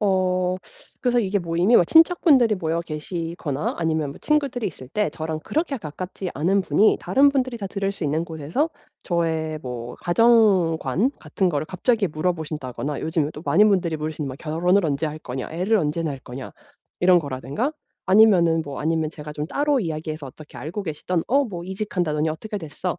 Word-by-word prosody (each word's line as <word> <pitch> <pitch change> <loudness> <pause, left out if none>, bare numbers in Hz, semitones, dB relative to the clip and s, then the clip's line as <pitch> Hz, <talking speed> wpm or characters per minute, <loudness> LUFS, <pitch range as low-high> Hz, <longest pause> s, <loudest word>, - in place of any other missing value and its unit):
어 185 -2 +1 0.4
그래서 245 -1 +2
이게 200 -3 +1
모임이 175 +6 +1
뭐 - - +8
친척분들이 315 - +5
모여 165 -1 -1
계시거나 160 -2 -4
아니면 160 -3 0
뭐 - - -11
친구들이 280 -6 0
있을 130 -7 -8
때 210 +6 0
저랑 160 -1 -4
그렇게 310 -4 -1
가깝지 180 +3 -6
않은 185 +7 +2
분이 210 +3 +3
다른 280 +1 +4
분들이 260 -3 -1
다 200 -3 -5
들을 195 0 -2
수 190 - -5
있는 155 +3 0
곳에서 160 - -1 0.4
저의 160 -3 -1
뭐 120 -2 -6
가정관 190 - +3
같은 190 -2 -1
거를 150 -3 -1
갑자기 200 +1 +1
물어보신다거나 150 -4 -3
요즘에 160 -2 0
또 150 - -9
많은 210 +5 +5
분들이 180 -5 +1
물으시는 155 -1 -4
뭐 130 - -6
"결혼을 175 +4 +1
언제 145 +1 0
할 155 +1 -5
거냐?", 130 -3 -6
"애를 190 +7 +1
언제 160 0 -1
낳을 145 -4 -3
거냐?" 125 +2 -8 0.5
이런 180 0 +6
거라든가 145 - -3 0.3
아니면은 185 -5 +5
뭐 140 -1 -6
아니면 160 0 0
제가 150 -1 -9
좀 150 0 -4
따로 285 - +1
이야기해서 155 -3 -4
어떻게 150 +3 -12
알고 175 +7 -5
계시던 165 0 -2
"어 280 +3 +3
뭐 175 -7 -6
이직한다더니 180 -6 -1
어떻게 210 +6 -5
됐어?", 170 +2 -4
170 Hz, 400 characters per minute, -23 LUFS, 155-205 Hz, 0.5 s, 뭐